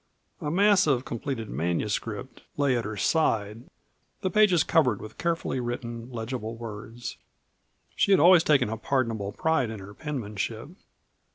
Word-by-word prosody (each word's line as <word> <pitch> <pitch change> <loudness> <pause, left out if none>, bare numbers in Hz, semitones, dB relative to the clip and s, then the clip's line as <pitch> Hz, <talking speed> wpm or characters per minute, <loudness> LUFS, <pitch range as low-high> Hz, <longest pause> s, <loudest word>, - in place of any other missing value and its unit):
A 150 - -2
mass 200 +2 +4
of 130 -3 +2
completed 120 -1 -4
manuscript 100 - -3 0.2
lay 140 -3 +2
at 120 - -1
her 110 -1 -5
side, 110 - +1 0.6
the 185 - -1
pages 190 -5 +5
covered 130 - +2
with 110 +1 -10
carefully 170 -6 -1
written, 120 -1 -5
legible 115 -1 -4
words. 115 +1 -7 0.8
She - - +2
had 195 - +6
always 175 +2 +7
taken 140 -6 +3
a 110 - -3
pardonable 115 -4 -1
pride 160 0 +1
in 110 -2 -6
her 100 +1 -10
penmanship. 115 -2 -4
120 Hz, 145 wpm, -27 LUFS, 110-150 Hz, 0.8 s, always